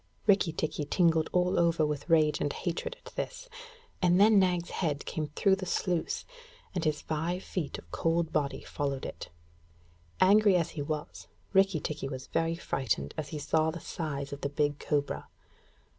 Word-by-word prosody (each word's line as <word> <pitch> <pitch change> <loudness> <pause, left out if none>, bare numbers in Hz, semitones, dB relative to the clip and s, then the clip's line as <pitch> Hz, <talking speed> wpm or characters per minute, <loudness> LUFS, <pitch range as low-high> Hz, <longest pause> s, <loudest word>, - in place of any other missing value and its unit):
Rikki 195 -5 +4
tikki 155 -1 -2
tingled 165 0 +3
all 180 0 +2
over 170 -2 +3
with 150 +2 -3
rage 155 -2 +4
and 145 - +1
hatred 175 - -3
at - - -11
this, - - -4 0.5
and 180 0 +4
then 210 0 +7
Nag's 180 -2 +1
head 150 -5 -1
came 155 -1 -3
through 195 -1 +4
the 185 -1 -5
sluice, 180 -2 -1 0.5
and 180 -3 -2
his 155 -1 0
five 165 +4 -2
feet 160 -7 -3
of 85 - -14
cold 165 0 0
body 145 -2 -1
followed 140 -2 -3
it. - - -7 0.9
Angry 205 +1 +6
as 170 -3 +1
he 150 - -5
was, 150 +1 -5 0.3
Rikki 195 -3 +4
tikki 150 -2 -4
was 130 -1 -6
very 165 0 +1
frightened 115 - -2
as 150 - -4
he 150 - -5
saw 155 +2 +1
the 165 +2 -5
size 145 -6 -4
of 140 - -7
the 140 - -1
big 145 0 0
cobra. 145 -2 -1
160 Hz, 175 wpm, -30 LUFS, 145-180 Hz, 0.9 s, then